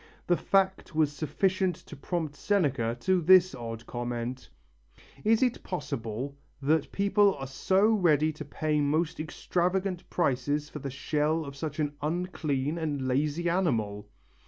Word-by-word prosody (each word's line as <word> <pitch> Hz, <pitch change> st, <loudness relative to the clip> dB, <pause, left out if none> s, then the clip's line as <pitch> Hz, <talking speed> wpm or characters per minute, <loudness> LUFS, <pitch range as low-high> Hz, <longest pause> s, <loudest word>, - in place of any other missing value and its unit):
The 175 Hz, -, +3 dB
fact 190 Hz, -2 st, +1 dB
was 155 Hz, -2 st, +3 dB
sufficient 180 Hz, +5 st, 0 dB
to 150 Hz, -, -12 dB
prompt 155 Hz, 0 st, -3 dB
Seneca 140 Hz, -, 0 dB
to 185 Hz, +3 st, +2 dB
this 185 Hz, +1 st, +6 dB
odd 115 Hz, -2 st, -6 dB
comment: 120 Hz, +1 st, -4 dB, 0.7 s
"Is 220 Hz, +3 st, +4 dB
it 250 Hz, -2 st, 0 dB
possible 135 Hz, -, -4 dB, 0.2 s
that 145 Hz, +2 st, +1 dB
people 200 Hz, 0 st, +3 dB
are 135 Hz, -, -6 dB
so 190 Hz, +9 st, +2 dB
ready 160 Hz, -8 st, +3 dB
to 150 Hz, -, -7 dB
pay 150 Hz, +1 st, -1 dB
most 150 Hz, +3 st, 0 dB
extravagant 180 Hz, +3 st, -1 dB
prices 145 Hz, -1 st, 0 dB
for 150 Hz, -, -7 dB
the 140 Hz, -, -4 dB
shell 150 Hz, +3 st, 0 dB
of 140 Hz, 0 st, -8 dB
such 150 Hz, +1 st, -5 dB
an 145 Hz, -1 st, 0 dB
unclean 155 Hz, -2 st, -1 dB
and 145 Hz, -5 st, -2 dB
lazy 150 Hz, +6 st, 0 dB
animal!" 115 Hz, -, 0 dB
155 Hz, 140 wpm, -29 LUFS, 135-180 Hz, 0.7 s, this